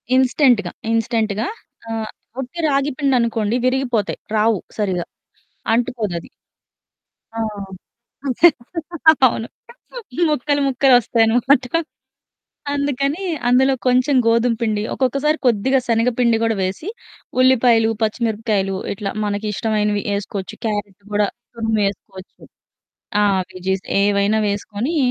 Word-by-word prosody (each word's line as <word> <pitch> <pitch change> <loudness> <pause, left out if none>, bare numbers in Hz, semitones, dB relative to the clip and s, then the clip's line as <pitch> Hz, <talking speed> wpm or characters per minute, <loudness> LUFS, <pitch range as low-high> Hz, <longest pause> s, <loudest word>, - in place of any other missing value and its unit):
ఇన్‌స్టంట్‌గా. 250 - +3 0.2
ఇన్‌స్టంట్‌గా, 225 -1 0 0.4
ఆ! - - -4 0.5
వుట్టి 265 +6 -6
రాగిపిండనుకోండి 255 -6 +1
విరిగిపోతయి. 255 -5 0 0.2
రావు 215 0 +3 0.2
సరిగ్గా. 190 -5 -1 0.7
అంటుకోదది. 220 -7 -2 1.1
ఆ! - - -2 1.9
అవును. 230 -1 -3 0.8
ముక్కలు 290 0 0
ముక్కలు 270 0 +3
ఒస్తాయనమాట. 245 +4 +2 1.1
అందుకని 285 +4 -1 0.2
అందులో 260 +2 +4
కొంచెం 255 +3 +3
గోధుమ 230 +1 +3
పిండి. 215 -2 0
ఒక్కొక్కసారి 275 +4 +1
కొద్దిగా 250 +3 +3
శనగపిండి 235 0 +2
గూడా 225 -1 +1
వేసి, 190 - -3 0.5
ఉల్లిపాయలు, 245 -3 +4
పచ్చిమిరపకాయలు, 215 -3 0 0.2
ఇట్లా 200 0 -4 0.2
మనకి 205 +1 -2
ఇష్టమైనవి 210 -1 0
ఏసుకోవచ్చు. 200 -1 -5
క్యారెటు 205 -2 -3
గూడా 205 0 +2 0.3
తురుమేసుకోవచ్చు. 200 -4 -3 0.8
ఆ! - - +4 0.3
వెజ్జీస్ 190 +1 -2 0.2
ఏవైనా 205 +1 +2
వేసుకొని 205 +9 -3
225 Hz, 90 wpm, -20 LUFS, 205-255 Hz, 1.9 s, అందులో